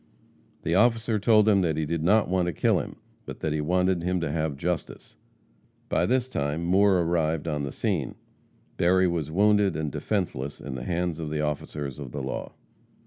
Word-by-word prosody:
The 85 - 0
officer 115 +2 +3
told 110 0 +4
him 100 -3 +5
that 80 -4 0
he 80 - 0
did 80 +1 -2
not 105 +6 +3
want 90 0 +1
to 85 - -1
kill - - +2
him, - - -6 0.3
but - - -7
that 80 - -1
he 75 - -1
wanted 90 +2 +1
him 90 +1 0
to 80 -3 -2
have 80 -3 -2
justice. 90 +4 -4 0.7
By - - +1
this 125 +1 +1
time 75 - -2
Moore 95 +1 +4
arrived 80 -2 0
on 75 -1 -1
the 70 -1 -3
scene. 90 - -2 0.6
Berry 95 +2 +4
was 85 -4 -2
wounded 105 +2 +3
and 75 -2 -2
defenseless 70 -7 -3
in 70 - -7
the 65 -1 -6
hands 85 -2 -1
of 80 -2 -4
the 75 0 -2
officers 75 -2 -4
of 65 -4 -8
the - - -4
law. - - -5
85 Hz, 195 wpm, -26 LUFS, 75-95 Hz, 0.7 s, him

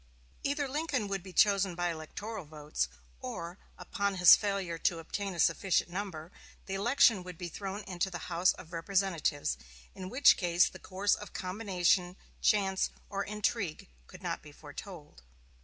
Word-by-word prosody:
Either 285 0 0
Lincoln 275 -5 -1
would 195 -1 -2
be 185 +1 -10
chosen 195 -1 +3
by 175 0 0
electoral 190 +6 -6
votes, 150 - -3 0.3
or, 170 - -6 0.2
upon 200 -1 -2
his 180 -1 +9
failure 195 -5 -2
to 170 - +1
obtain 190 +4 -4
a - - -7
sufficient 180 +1 +2
number, 180 -4 -5 0.3
the 190 - -5
election 225 0 +4
would 180 -2 -9
be 175 0 -5
thrown 195 +3 -5
into 185 0 -2
the 175 -3 -6
House 175 +1 +3
of 170 0 -13
Representatives, 170 -4 0 0.3
in 185 -1 -7
which 265 +6 +6
case 175 -1 +3
the - - -9
course 195 +2 0
of 210 - -5
combination, 185 -2 +1 0.3
chance, 195 -3 +2 0.2
or 200 0 -1
intrigue 210 - -2 0.2
could - - -13
not - - -2
be - - -13
foretold. - - -10
190 Hz, 155 wpm, -31 LUFS, 175-205 Hz, 0.3 s, his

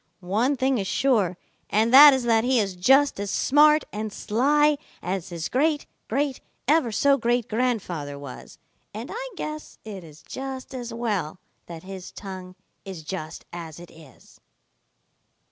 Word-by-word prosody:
One 255 +7 +2
thing 260 -1 +1
is 195 - -3
sure, 205 -11 +1 0.3
and 220 +3 +2
that 290 +2 +11
is 265 -2 0
that 225 -2 +3
he 255 +1 +2
is 195 -3 -1
just 270 +8 +4
as 200 0 -3
smart 300 +7 +4
and 215 +1 -4
sly 290 +8 +2 0.2
as 185 0 -4
his 170 -2 -4
great 295 +3 +1 0.2
great 275 +2 -1 0.3
ever 295 -5 +3
so 275 +6 +3
great 240 0 +1
grandfather 205 - -2
was, 140 -3 -10 0.4
and 225 +4 -6
I - - -5
guess 305 -3 -6
it 200 -4 -7
is 155 -2 -15
just 265 -1 -7
as 245 -2 -6
well 210 -9 -2 0.3
that 165 -2 -9
his 190 -1 -8
tongue 185 -2 -9 0.3
is 185 -5 -8
just 155 -1 -6
as 165 -2 -8
it 175 - -12
is." 160 -4 -18
225 Hz, 155 wpm, -25 LUFS, 185-270 Hz, 0.4 s, that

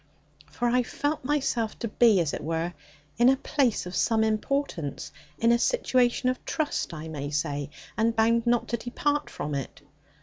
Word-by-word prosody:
For 245 - -2
I 250 +1 +3
felt 290 +4 -2
myself 255 -5 0
to 235 - -3
be, 220 -2 +4
as 160 -4 0
it - - -4
were, 165 +2 -2 0.5
in 240 +1 +7
a 270 - +5
place 260 -7 0
of 180 - -6
some 220 -1 +2
importance; 215 - -2 0.3
in 230 +1 +3
a 235 - +4
situation 255 - +2
of 255 0 -1
trust, 305 -9 -2
I 160 -1 -7
may 145 -3 -5
say; 145 -1 -2 0.3
and 230 +1 +1
bound 230 +1 +3
not 240 0 +2
to 235 - 0
depart 290 +5 -1
from 145 0 -5
it. 140 0 -5
230 Hz, 175 wpm, -27 LUFS, 165-255 Hz, 0.5 s, in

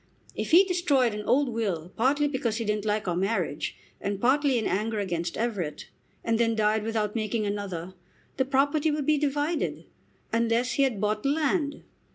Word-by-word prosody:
If - - -4
he 350 +4 +8
destroyed 305 - +2
an 210 0 -5
old 280 0 +3
will, 195 -8 -2
partly 285 +5 +2
because 255 -6 -1
he 230 - -2
didn't 210 0 -1
like 210 -1 0
our 175 - 0
marriage, 185 -5 -1 0.2
and 200 -1 -2
partly 270 +3 +3
in 225 - -1
anger 215 +3 -1
against 175 -4 -2
Everett, 205 -10 -3 0.3
and 230 0 +1
then 230 -1 +2
died 215 0 +2
without 215 -1 -1
making 220 -1 -1
another, 190 -4 -4 0.4
the 265 - +2
property 285 +3 +2
would 295 -2 -1
be 305 0 +3
divided, 295 +3 -1 0.5
unless 230 +2 +2
he - - 0
had 260 -7 +1
bought 210 +1 0
land. 290 +1 0
230 Hz, 175 wpm, -27 LUFS, 210-280 Hz, 0.5 s, he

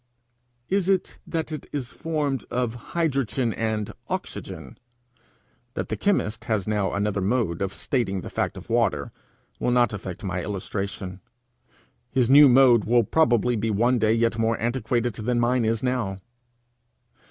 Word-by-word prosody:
Is 195 -1 +1
it 190 -2 0
that 160 -1 -3
it 155 - -6
is 135 -5 -4
formed 150 -5 -2
of 125 -2 -1
hydrogen 135 -3 -1
and 110 -2 -2 0.2
oxygen? - - -6 1.0
That - - -3
the - - -1
chemist 110 - 0
has 110 -4 -1
now 105 -2 0
another 100 -1 0
mode 100 -4 0
of 95 -1 -1
stating 95 -3 -1
the - - -8
fact - - -2
of - - -10
water, - - +1 0.5
will - - 0
not 120 -2 +3
affect 95 -2 -6
my 90 -2 -2
illustration. 95 -1 -4 0.9
His 125 0 +2
new 145 0 +9
mode 125 -3 +6
will 120 +1 +4
probably 120 -2 +2
be 110 +1 -1
one 120 +4 +2
day 110 0 +3
yet 115 0 +1
more 115 0 +1
antiquated 120 0 0
than 120 +4 -1
mine 120 0 +2
is 110 +1 0
now. 125 -7 -1
115 Hz, 150 wpm, -25 LUFS, 105-130 Hz, 1.0 s, new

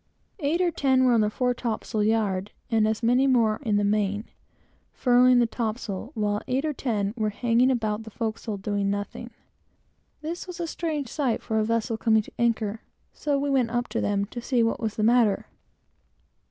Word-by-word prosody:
Eight 320 +3 0
or 355 -1 +2
ten 265 -4 +2
were 250 - +4
on 230 - +4
the 210 - +2
fore 250 +3 0
topsail 225 -2 -3
yard, 210 -3 +1 0.2
and 220 -1 +3
as 220 +2 -2
many 250 +4 +4
more 230 -4 +3
in 220 -6 0
the 205 - +1
main, 205 +1 0 0.7
furling 250 0 +4
the 240 - +5
topsails, 220 -2 -4
while 210 -1 0
eight 265 +4 0
or 305 - -1
ten 210 -7 -1
were 215 -2 0
hanging 240 +4 +2
about 220 -4 0
the 220 - -9
forecastle, 220 -1 -4
doing 200 0 -1
nothing. 205 0 -4 0.9
This 335 +4 -5
was 360 -1 -8
a 340 - -1
strange 315 -4 -3
sight 260 -2 -1
for 220 0 0
a - - +2
vessel 230 +1 -1
coming 220 -1 +3
to - - -14
anchor; 225 -2 0 0.3
so 290 -2 -1
we 280 0 -1
went 255 -4 +2
up 240 +1 -1
to - - -2
them, 200 -1 0
to 240 +4 -7
see 240 -1 +1
what 225 - 0
was 220 -2 -3
the 215 - -1
matter. 230 -3 +3
230 Hz, 195 wpm, -26 LUFS, 215-255 Hz, 0.9 s, the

